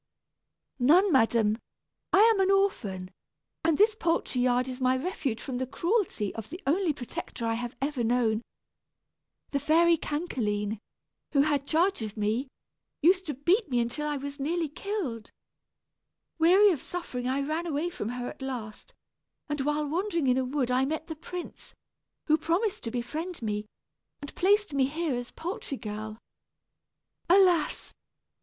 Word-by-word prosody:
"None, 350 +10 +5
madam; 225 -4 +3 0.5
I 385 - +6
am 445 -2 +5
an 385 0 +3
orphan, 210 - +1 0.5
and 325 -2 +3
this 430 +2 +5
poultry 330 - 0
yard 250 0 +2
is 255 0 -6
my 255 0 +3
refuge 270 - -2
from 250 +1 -4
the 260 - -2
cruelty 340 - 0
of 220 -1 -7
the 345 - -7
only 335 +4 +2
protector 245 -3 -6
I 225 - +1
have 240 +1 -4
ever 275 -4 -1
known. 230 -2 +2 1.1
The 280 - +1
fairy 330 +4 +4
Cancaline, 220 - -2 0.5
who 280 - +5
had 285 -2 0
charge 350 0 +2
of 215 -1 -5
me, 215 +6 0 0.6
used 365 +2 +4
to 295 - -3
beat 345 - +2
me 245 -2 +1
until 240 +6 -1
I 295 -1 -1
was 280 +1 -6
nearly 325 +3 -1
killed. 305 - -4 1.1
Weary 380 +5 +6
of 310 - -2
suffering 260 -9 -4
I 270 +2 0
ran 325 +3 -2
away 320 +3 -1
from 345 - -4
her 245 0 -4
at - - -9
last; 255 - -6 0.5
and 295 -1 -1
while 295 +2 0
wandering 340 0 -1
in 255 -1 +3
a - - +1
wood 255 -1 -1
I 255 +1 +3
met 315 +4 -3
the 320 - -4
prince, 350 +3 -8 0.5
who 310 0 +3
promised 360 +7 0
to - - -1
befriend 275 +7 -4
me, 210 -1 -2 0.5
and 285 - -8
placed 410 -2 +2
me 270 -2 +3
here 315 +1 -2
as 245 0 -4
poultry 355 - -5
girl. 215 0 -6 1.1
Alas! 360 -4 +3
285 Hz, 155 wpm, -28 LUFS, 245-345 Hz, 1.1 s, I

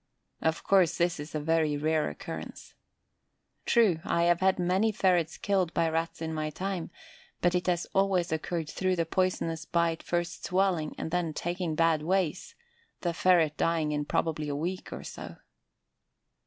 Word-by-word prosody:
Of 160 0 0
course 190 -4 +3
this 170 -2 +1
is 150 +2 -7
a - - 0
very 155 -1 +1
rare 155 +1 +1
occurrence. - - -8 0.9
True, 215 -9 +4
I 170 - +1
have 175 0 +3
had 190 0 +3
many 185 +5 +2
ferrets 180 -5 +1
killed 190 -4 0
by 165 -1 +2
Rats 165 0 -2
in 160 0 -3
my 155 -1 -2
time, 185 +2 -4 0.5
but 175 0 +2
it 180 0 0
has 175 -1 +1
always 190 -3 +2
occurred 160 0 -2
through 185 +4 0
the 165 -2 0
poisonous 165 -2 -1
bite 170 -1 0
first 175 0 -2
swelling 180 -4 0
and 160 - -4
then 170 -3 -1
"taking 175 -2 -2
bad 165 -1 +3
ways," 185 +1 -1 0.5
the 175 -1 -1
ferret 165 -3 +3
dying 165 -2 +1
in 150 0 -1
probably 155 0 -1
a 145 - -2
week 175 +5 -4
or - - -6
so. - - -8
170 Hz, 165 wpm, -29 LUFS, 160-185 Hz, 0.9 s, True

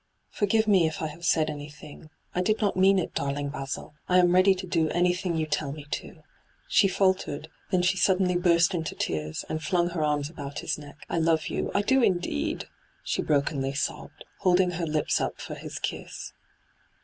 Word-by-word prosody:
' - - -47
Forgive 220 +2 +2
me 190 -6 +5
if 160 - -4
I 155 - -1
have 160 +3 -12
said 160 -1 +3
anything. 150 +1 -9 0.2
I 180 - 0
did 215 +4 +1
not 205 -3 +1
mean 190 +1 +5
it, 185 - -2
darling 140 0 -2
Basil. 140 +1 -5 0.2
I 180 - +5
am 175 -1 +5
ready 185 +1 +5
to 185 0 -6
do 165 -3 +1
anything 180 +1 +1
you 160 -1 0
tell 150 -2 -2
me 145 0 -8
to.' - - -6 0.4
She - - +4
faltered; 185 -6 0 0.2
then 180 -1 +2
she 190 +2 +2
suddenly 185 -1 +3
burst 175 0 +4
into 165 -3 -3
tears, 75 0 -3
and 155 - -3
flung 175 +1 +1
her 165 -3 -1
arms 150 -1 +1
about 145 -2 -8
his - - -1
neck. 145 -1 -12
' - - -18
I 170 - -1
love 160 -1 +2
you - - -2
— - - -17
I 200 - +3
do 265 +5 +3
indeed 175 - 0
I' - - -20 0.4
she - - -1
brokenly 140 -2 0
sobbed, 145 - -4
holding 180 -1 +3
her 170 -1 -3
lips 155 -1 +1
up - - -3
for - - -6
his - - -7
kiss. - - -5
170 Hz, 210 wpm, -27 LUFS, 150-185 Hz, 0.4 s, me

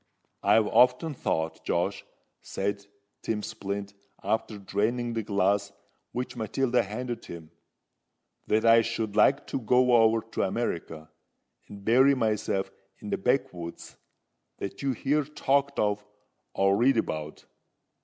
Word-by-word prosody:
"I've 110 -1 +4
often 125 +8 +3
thought, 80 - -2
Josh," - - -1 0.4
said 100 +1 -3 0.4
Tim 105 -2 -2
Splint, 100 0 -5 0.3
after 110 -1 -1
draining 115 +5 -1
the 115 - -1
glass 100 -1 +1 0.4
which 125 +1 -4
Matilda 120 +3 +1
handed 120 +4 -5
him, 80 -2 -10 1.0
"that 110 +1 +2
I 115 0 +7
should 115 -2 -3
like 135 +6 +4
to - - -3
go 125 +1 +3
over 115 0 +4
to - - -1
America, 85 -7 -3 0.6
and 100 -1 -12
bury 130 +5 +5
myself 105 -5 -1 0.3
in 105 - -8
the - - +1
backwoods 90 -7 -2 0.6
that 100 - -6
you 135 -1 0
hear 145 +5 0
talked 140 -1 0
of 105 0 0 0.5
or 95 0 +3
read 125 +3 +3
about. 75 -7 -3
110 Hz, 125 wpm, -27 LUFS, 100-125 Hz, 1.0 s, I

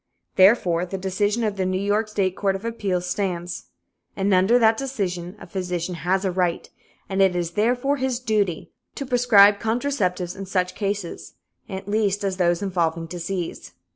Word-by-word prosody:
Therefore, 185 -4 +4
the 185 +2 -4
decision 205 +4 0
of 210 -2 -1
the 190 - 0
New 185 0 0
York 205 +2 +1
State 195 -3 -1
Court 195 -1 0
of 195 +3 -7
Appeals 195 -6 -2
stands. 180 -3 -3 0.5
And 195 0 +1
under 190 +6 +5
that 225 -2 +4
decision, 195 -9 -3
a - - -10
physician 180 -2 -3
has 185 +3 -1
a 190 - +1
right, 180 -1 -1 0.4
and 195 0 0
it 190 -2 +4
is 175 -1 -1
therefore 245 +8 +1
his 260 -2 -1
duty, 210 -8 -1 0.2
to 280 - -4
prescribe 225 -5 +5
contraceptives 220 -7 -1
in 195 -1 -7
such 185 -1 0
cases, 200 -3 -4 0.3
at 190 0 -6
least, 205 -1 0
as 190 -2 -1
those 175 0 +1
involving 170 -4 -1
disease. 175 +1 -5
195 Hz, 170 wpm, -23 LUFS, 180-215 Hz, 0.5 s, under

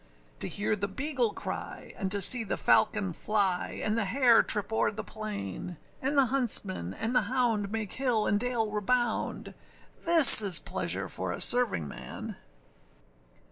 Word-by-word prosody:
To - - -1
hear 210 +1 -3
the 200 -1 -4
beagle 255 +2 -4
cry, - - -9
and 190 -2 -6
to 200 0 0
see 230 +5 +6
the 210 - -5
falcon 210 -4 0
fly, 195 0 -3
And 215 - -2
the 230 -2 -2
hare 240 +3 +2
trip 210 +1 +2
over - - 0
the 220 +1 -8
plain, 185 - -8 0.2
And 275 +2 -3
the 275 - +4
huntsmen 210 - 0
and 230 +3 -5
the - - +3
hound 230 -6 -2
make 220 -3 -6
hill 245 -5 -1
and 205 - -1
dale 235 -3 -3
rebound: 235 +3 -3 0.5
This 330 -9 +9
is 195 -4 +4
pleasure - - -6
for - - -5
a - - -7
servingman! 225 - 0
220 Hz, 155 wpm, -27 LUFS, 200-245 Hz, 0.5 s, This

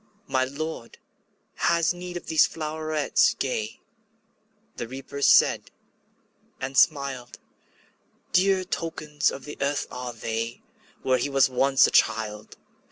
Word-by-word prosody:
``My 130 0 +1
Lord 155 -3 -6 0.6
has 170 0 +2
need 175 0 -7
of - - -9
these 160 -1 +4
flowerets 155 -1 0
gay,'' 110 -5 -3 1.0
The 120 - -4
Reaper 135 +3 -8
said, - - +4 0.9
and 135 +1 -5
smiled; 135 -5 +1 1.0
``Dear 185 0 +3
tokens 155 -4 -1
of 135 - -8
the 150 - -9
earth 140 +1 0
are 125 -1 -5
they, 115 0 -4 0.4
Where 130 -1 +2
he 145 - -1
was 135 -1 +4
once 135 +1 +4
a - - 0
child. 105 -1 +1
140 Hz, 120 wpm, -25 LUFS, 125-155 Hz, 1.0 s, these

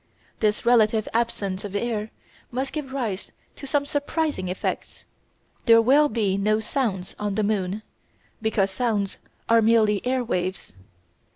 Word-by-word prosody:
This 210 +1 +1
relative 220 -2 +4
absence 205 -5 -1
of 205 -1 -6
air 215 0 -1 0.4
must 260 +2 -3
give 295 -4 -4
rise 230 -8 -3 0.2
to 275 - -8
some 285 +1 +1
surprising 290 - -1
effects. 180 +1 -4 0.6
There 230 0 +8
will 280 +6 +5
be 205 -4 0
no 215 +2 +2
sounds 220 -6 -2
on 205 -1 -2
the 215 - +1
moon, 200 0 -1 0.6
because 210 -3 +1
sounds 205 -2 -1 0.3
are 230 0 +5
merely 215 -2 +3
air 255 0 0
waves. 185 - -3
220 Hz, 135 wpm, -24 LUFS, 200-245 Hz, 0.6 s, There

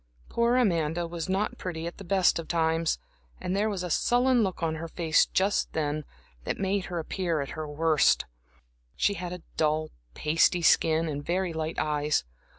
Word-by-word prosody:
Poor 235 +1 +2
Amanda 170 -7 +1
was 170 +1 -5
not 195 +3 -1
pretty 165 -3 -4
at 170 - -6
the - - -7
best 190 -2 +3
of 165 - -6
times, 165 -1 +1 0.4
and 180 - -2
there 210 +2 +1
was 195 -3 -3
a 180 - -3
sullen 245 +4 +3
look 190 -4 -2
on 160 -1 +1
her 160 +1 -5
face 165 -1 +2
just 195 +2 +1
then 150 -1 -1 0.4
that - - -2
made 195 0 0
her 175 - -5
appear 170 0 -1
at 140 - -3
her 155 -1 -5
worst. 155 0 +3 0.7
She 205 - +2
had 180 -2 -5
a 180 -1 -7
dull, 155 0 +1 0.2
pasty 165 +3 +2
skin 160 0 +4
and 145 -2 -4
very 180 +2 -1
light 160 0 -3
eyes. 150 - +1
165 Hz, 180 wpm, -28 LUFS, 155-190 Hz, 0.7 s, skin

